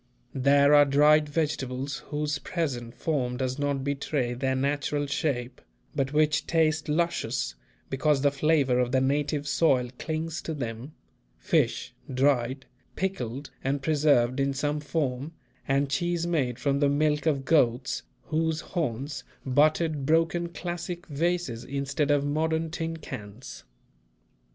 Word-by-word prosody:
There 140 +2 +4
are 145 0 +8
dried 150 +2 +4
vegetables 140 -3 -2
whose 150 -1 -2
present 130 -9 -3
form 125 -3 -1
does 130 +1 -2
not 140 -2 0
betray 140 -2 -1
their 130 +1 -1
natural 145 +2 0
shape, 130 -4 -2 0.3
but 135 -2 0
which 150 0 +2
taste 160 -1 +1
luscious, 170 +3 0 0.4
because 135 +1 +2
the 140 - +4
flavour 140 -3 +2
of 125 -1 +1
the 130 - +4
native 145 +2 0
soil 135 -5 +2
clings 160 +1 -3
to 160 - -4
them; 120 +1 -5 0.4
fish, - - 0 0.2
dried, 130 -1 +1 0.3
pickled 140 -8 -3
and 135 +1 -1
preserved 140 -4 +3
in 140 0 +1
some 145 +2 -1
form, 145 0 -2 0.3
and 140 +1 +2
cheese 175 +3 0
made 140 -9 0
from 140 -1 0
the 145 -1 +3
milk 150 +1 +1
of 140 -4 +1
goats 130 -5 +2 0.2
whose 160 +1 -1
horns 145 -4 -3 0.2
butted 150 +1 +2
broken 165 +2 +2
classic 175 0 -5
vases 155 -5 -1
instead 140 +2 -2
of 145 -1 +3
modern 160 +2 0
tin 165 0 -3
cans. 120 - -9
145 Hz, 130 wpm, -27 LUFS, 135-155 Hz, 0.4 s, are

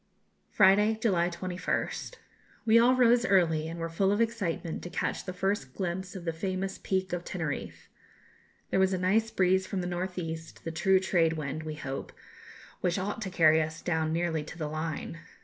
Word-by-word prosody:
Friday, 210 +2 +5
July 180 -6 +2
21st. 180 - -3 0.5
We 230 +1 +6
all 245 +2 +5
rose 240 -1 +5
early, 165 -8 +3
and 165 +1 -6
were 165 - -2
full 190 +4 +1
of 205 - +1
excitement 205 -8 -1
to 175 - -7
catch - - -2
the 185 - -3
first 185 -8 -2
glimpse 185 +1 -3
of 180 -2 -7
the 165 - -1
famous 190 +3 -3
Peak 190 -1 -1
of 175 -1 -2
Teneriffe. 160 -6 -5 0.8
There - - +2
was 190 0 +3
a - - +1
nice 205 +5 +2
breeze 190 -2 +2
from 195 - -2
the - - -4
north 180 +1 -3
east, 160 -2 -6
the 165 - -4
true 190 +4 +3
trade 170 -3 +2
wind, 150 -1 -4
we 155 -1 -5
hope, 135 -3 -5 0.7
which 180 0 0
ought 205 +3 -3
to 195 - -3
carry 160 -3 +5
us 155 +1 -4
down 160 -2 0
nearly 165 -2 0
to 165 - -9
the 155 -3 -3
Line. 155 +1 -4
180 Hz, 185 wpm, -29 LUFS, 160-195 Hz, 0.8 s, We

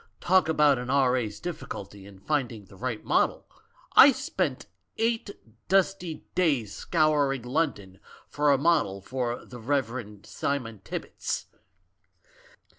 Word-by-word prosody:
Talk 185 -2 +3
about 150 -4 +4
an 125 0 -6
R.A.'s 125 -6 +1
difficulty 100 - -7
in 100 -1 -14
finding 120 -2 -2
the 95 - -16
right 115 +2 -4
model? - - +1 0.5
I - - +10
spent - - -2 0.3
eight 225 -1 0 0.4
dusty 185 -3 +1
days 140 - +1
scouring 150 -6 +1
London 125 - -2 0.3
for 150 0 +2
a 140 - +4
model 140 - +1
for 125 +1 -3
the 125 - -10
'Rev. 120 -5 -2
Simon 120 -7 -3
Tibbits'! - - -4
130 Hz, 115 wpm, -27 LUFS, 110-155 Hz, 0.5 s, I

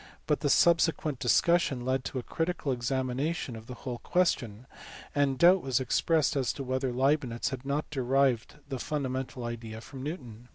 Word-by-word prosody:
But 150 - +1
the 145 - 0
subsequent 165 -4 +3
discussion 135 -1 +2
led 130 0 0
to - - -4
a 125 - -3
critical 165 -2 -2
examination 130 +3 -2
of 110 0 -10
the 125 - -7
whole 120 0 -6
question, 130 - 0 0.5
and 140 -2 +1
doubt 180 +5 +6
was 130 -1 +1
expressed 150 +4 +1
as 135 -3 +1
to 140 - -5
whether 130 0 -1
Leibnitz 130 -2 +1
had 130 0 -6
not 145 +2 -1
derived 130 -2 +1
the 135 -3 -4
fundamental 130 -3 -3
idea 115 -1 -5
from 130 +3 -10
Newton. 125 -6 -7
130 Hz, 165 wpm, -29 LUFS, 125-150 Hz, 0.5 s, doubt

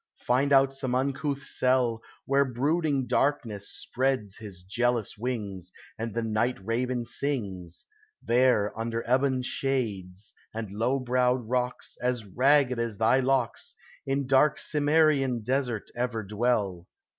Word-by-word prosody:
Find 135 +3 +2
out 135 0 +5
some 130 -2 -2
uncouth 140 +2 -1
cell, 125 -4 +1 0.2
Where 140 +1 +3
brooding 140 +2 0
Darkness 120 -5 0
spreads 130 -6 -2
his 100 -5 -10
jealous 120 +3 0
wings, 100 -6 -4 0.2
And 115 -1 -5
the 115 - 0
night 115 +3 0
raven 120 +2 -1
sings; 100 - -4 0.3
There 120 -4 +2
under 115 +1 -3
ebon 130 +1 +2
shades, 105 -8 -3 0.2
and 110 -3 -4
low 115 +6 0
browed 125 -1 +1
rocks, 125 +1 -2
As 125 -2 -1
ragged 130 +4 +3
as 115 -3 -2
thy 115 +5 +4
locks, 130 -2 0 0.3
In 135 +1 0
dark 135 +3 +4
Cimmerian 145 -5 +2
desert 125 -2 -1
ever 120 -2 -2
dwell. 100 -4 -1
125 Hz, 125 wpm, -27 LUFS, 110-135 Hz, 0.3 s, out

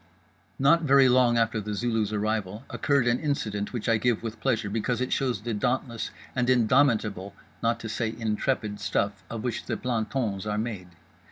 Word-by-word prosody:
Not 140 +5 +4
very 140 -3 +5
long 125 -1 +4
after 115 -1 +1
The 105 0 -4
Zulu's 110 -2 0
arrival 105 -1 -2
occurred 140 -4 +1
an 120 0 +2
incident 110 -9 -2
which 120 -4 -4
I 115 -1 +4
give 120 -1 +1
with 110 -1 -5
pleasure 115 -5 +1
because 115 +4 -1
it 125 - -1
shows 125 -7 0
the 115 +1 -3
dauntless 120 +2 -1 0.3
and 125 0 +1
indomitable, 115 -6 +2 0.3
not 115 0 +1
to 115 - -5
say 115 0 -2
intrepid, 110 -1 -1
stuff 100 -1 -1
of 115 -2 -5
which 125 - -2
plantons 110 -4 -2
are 105 0 -1
made. 105 -5 -3
115 Hz, 170 wpm, -27 LUFS, 105-125 Hz, 0.3 s, very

